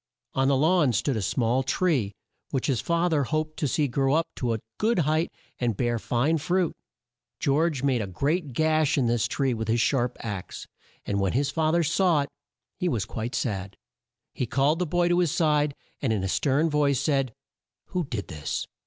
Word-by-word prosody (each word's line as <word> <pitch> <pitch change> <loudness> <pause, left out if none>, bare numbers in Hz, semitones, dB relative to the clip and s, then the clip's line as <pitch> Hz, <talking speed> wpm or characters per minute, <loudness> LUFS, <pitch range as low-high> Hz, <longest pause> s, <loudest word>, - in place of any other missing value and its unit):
On 135 0 +2
the 140 -1 +3
lawn 155 -3 +3
stood 135 +5 0
a 110 - -1
small 120 +5 +1
tree 135 - +1 0.4
which 135 -3 -1
his 125 -6 +1
fa 170 +1 +1
ther 150 -5 +1
hoped 155 +2 -2
to 150 - +1
see 145 +3 +1
grow 135 +2 +1
up 165 +1 +2
to 120 -3 0
a - - -4 0.2
good 225 +1 +2
height 155 +1 +1 0.3
and 120 -2 +1
to - - -13
bear 120 +1 0
fine 140 +9 +1
fruit. 180 +3 +1 0.7
George 145 -1 +1
made 130 -4 +2
a 100 - -3
great 140 - -1
gash 155 +1 +2
in 135 - +2
this 115 -1 +1
tree 135 -3 0
with 110 -1 -3
his 115 +1 +2
sharp 125 0 +1
axe, 105 -5 -6 0.4
and 100 - -1
when 95 -2 +1
his 140 +3 +1
fa 155 0 +1
ther 170 +1 +3
saw 165 -1 +3
it 140 - -8 0.5
he 180 - +1
was 115 - -1
quite 115 +3 -4
sad. 100 -5 -3 0.6
He 125 - -2
called 140 +6 +2
the 180 - 0
boy 175 +2 +2
to 175 0 +3
his 175 -5 +2
side, 150 -3 +2 0.3
and 130 - 0
in 105 -4 0
a - - 0
stern 140 - +2
voice 145 -4 +2
said: 135 -5 +1 0.6
"Who 180 - -1
did 115 -7 -4
this? 75 -3 -4
140 Hz, 205 wpm, -26 LUFS, 120-160 Hz, 0.7 s, the